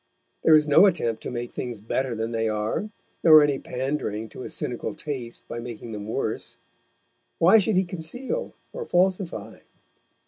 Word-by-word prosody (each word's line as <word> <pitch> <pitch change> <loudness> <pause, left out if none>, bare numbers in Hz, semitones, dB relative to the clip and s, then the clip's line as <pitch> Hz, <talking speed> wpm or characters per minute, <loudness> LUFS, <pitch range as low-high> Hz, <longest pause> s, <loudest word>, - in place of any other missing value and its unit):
There 160 - +6
is 150 0 +4
no 160 +7 +7
attempt 120 - 0
to - - -5
make 120 -1 -4
things 120 -4 -5
better 120 +4 -2
than 115 +1 -3
they 115 -1 0
are, 110 - -2 0.3
nor 155 -2 +9
any 145 -2 +1
pandering 125 -5 -3
to - - -10
a - - -6
cynical 120 -2 -3
taste 130 -6 -6
by 120 - -5
making 120 -1 -7
them 105 -1 -6
worse. 115 0 -3 0.8
Why 185 +7 +7
should 210 0 +1
he 185 +1 +3
conceal 215 - -4 0.2
or - - -4
falsify? 175 - 0
130 Hz, 165 wpm, -25 LUFS, 115-170 Hz, 0.8 s, nor